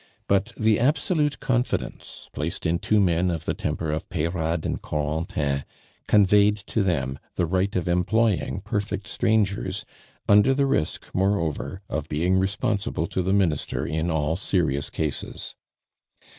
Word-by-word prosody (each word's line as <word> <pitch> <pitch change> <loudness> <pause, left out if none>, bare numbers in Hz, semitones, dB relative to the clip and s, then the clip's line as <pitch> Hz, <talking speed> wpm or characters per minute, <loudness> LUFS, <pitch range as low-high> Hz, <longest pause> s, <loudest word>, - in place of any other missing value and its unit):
But 100 +4 +2
the 110 -2 +3
absolute 145 +2 +1
confidence 125 -2 -2
placed 75 +3 -3
in 85 +1 +1
two 105 +3 +2
men 90 -2 +2
of 80 -2 -3
the - - 0
temper 80 -2 -2
of 75 - -4
Peyrade 80 -1 -1
and - - -2
Corentin 75 -2 -1 0.4
conveyed 105 0 +5
to 105 +2 -2
them 70 -9 0 0.2
the 90 - +1
right 95 +4 0
of 90 -2 0
employing 95 +3 +1
perfect 100 0 -3
strangers, 100 -3 0 0.4
under 105 +6 +5
the 140 0 +2
risk, 75 - 0
moreover, 95 -1 -1
of 75 -1 -4
being 90 +5 +2
responsible 100 -3 -1
to 95 - -2
the 95 +1 0
Minister 90 -7 +1
in 80 +2 -1
all 80 -1 0
serious 80 -7 0
cases. 75 -3 -4
95 Hz, 140 wpm, -25 LUFS, 80-105 Hz, 0.4 s, conveyed